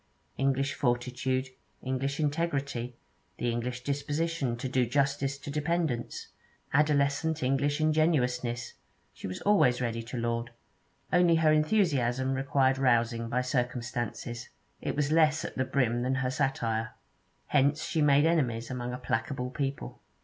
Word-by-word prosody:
English 135 0 +1
fortitude, 125 +1 -1 0.3
English 135 +2 -2
integrity, 140 -6 -1 0.4
the 120 - 0
English 120 +1 -3
disposition 145 -1 -1
to 130 +2 -3
do 130 0 +2
justice 140 +2 0
to 140 +1 -7
dependents, 150 -4 -2 0.4
adolescent 150 +1 +2
English 140 +3 +1
ingenuousness, 125 -7 +1 0.4
she - - -7
was 95 - -6
always 190 -12 +4
ready 115 -2 -2
to 120 +2 -7
laud. 115 0 -1 0.6
Only 175 -1 +5
her 160 -1 +4
enthusiasm 140 - +2
required 135 0 +2
rousing 115 -3 +2
by 125 +2 +1
circumstances; 120 -2 -3 0.3
it - - -2
was 145 0 0
less 155 -1 +3
at - - -6
the 130 - 0
brim 125 -3 +1
than 130 +2 0
her 130 -1 0
satire. 115 -5 -1 0.5
Hence 145 +1 +2
she 160 - 0
made 145 0 +5
enemies 125 -8 +1
among 125 -1 -4
a - - -3
placable 125 +1 -2
people. 135 0 -4
130 Hz, 135 wpm, -29 LUFS, 120-145 Hz, 0.6 s, Only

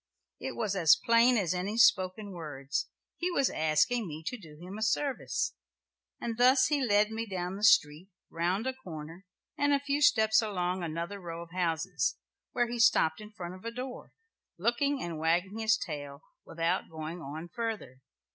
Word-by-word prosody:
It - - -5
was 215 -4 -1
as 165 -5 +6
plain 235 +1 +4
as 185 -5 +1
any 190 +5 -3
spoken 200 -1 +3
words; 150 -5 -4 0.3
he 355 - -1
was 275 -7 +1
asking 160 +9 +1
me 155 0 -7
to 250 - -2
do 160 -10 -13
him 185 +5 -8
a - - -7
service. 265 +5 0 0.7
And 230 -1 -4
thus 255 +1 +5
he 290 -3 +1
led 210 -2 +3
me 225 +1 -3
down 185 -1 -3
the 205 - -7
street, 165 -3 +4 0.2
round 180 +6 -1
a 260 - -1
corner, 170 -5 -10 0.3
and 285 0 +3
a 280 - +3
few 285 +1 -1
steps 220 -6 +5
along 185 -4 -2
another 170 +4 -4
row 170 -2 -6
of 170 - -16
houses, 165 -6 -1 0.3
where 240 -1 +1
he 240 0 -4
stopped 215 -8 +4
in 210 - -10
front 175 -3 -7
of 185 - -12
a 230 - -3
door, 250 +2 -7 0.5
looking 250 +8 0
and 170 -2 -5
wagging 175 +6 0
his 220 -1 +3
tail, 145 -3 -6 0.2
without 165 +3 -1
going 160 +2 -6
on 155 +4 -7
further. 220 - -5
190 Hz, 175 wpm, -30 LUFS, 165-230 Hz, 0.7 s, as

